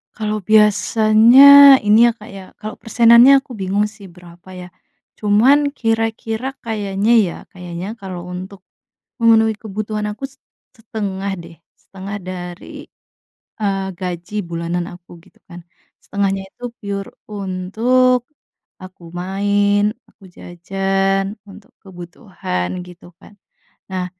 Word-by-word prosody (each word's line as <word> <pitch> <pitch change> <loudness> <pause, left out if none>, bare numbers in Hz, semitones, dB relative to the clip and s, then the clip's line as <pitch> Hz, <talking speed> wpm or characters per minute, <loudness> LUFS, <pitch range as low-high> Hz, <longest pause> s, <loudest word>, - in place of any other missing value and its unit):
Kalau 215 -1 -3
biasanya 220 +7 +6
ini 210 +2 +5
ya - - 0
Kak 210 - -13
ya, 195 -1 -9 0.2
kalau 215 +2 -7
persenannya 235 +2 +6
aku 270 -1 -18
bingung 200 0 -1
sih 210 -3 -11
berapa 175 +1 -17
ya, 180 - -10 0.5
cuman 255 +8 +3
kira-kira 225 +1 -2 0.2
kayaknya 210 -1 -2 0.2
ya, - - -6 0.2
kayaknya 180 0 -7
kalau 180 -3 -8
untuk, 185 +1 -9 0.6
memenuhi 225 -1 +4
kebutuhan 215 0 -5
aku, 220 - -12
set 265 - -26 0.3
setengah 200 -4 -5
deh 170 0 -12 0.2
setengah 195 +1 -9
dari, 180 -1 -9 0.8
eee, 195 -1 -1
gaji 180 +2 -7
bulanan 170 0 -4
aku 175 -1 -15
gitu - - -25
kan, 175 -1 -12 0.4
setengahnya 195 -1 -2
itu 245 - -15 0.2
pure 200 -1 -6 0.2
untuk, 225 +6 0 0.6
aku 185 -1 -13
main, 205 +3 0 0.2
aku 195 - -22
jajan 195 +3 -2
untuk 200 +1 -15
kebutuhan 175 - -6 0.2
gitu 175 0 -16
kan, 205 - -18 0.5
nah 185 -1 -3
200 Hz, 115 wpm, -18 LUFS, 185-220 Hz, 0.8 s, biasanya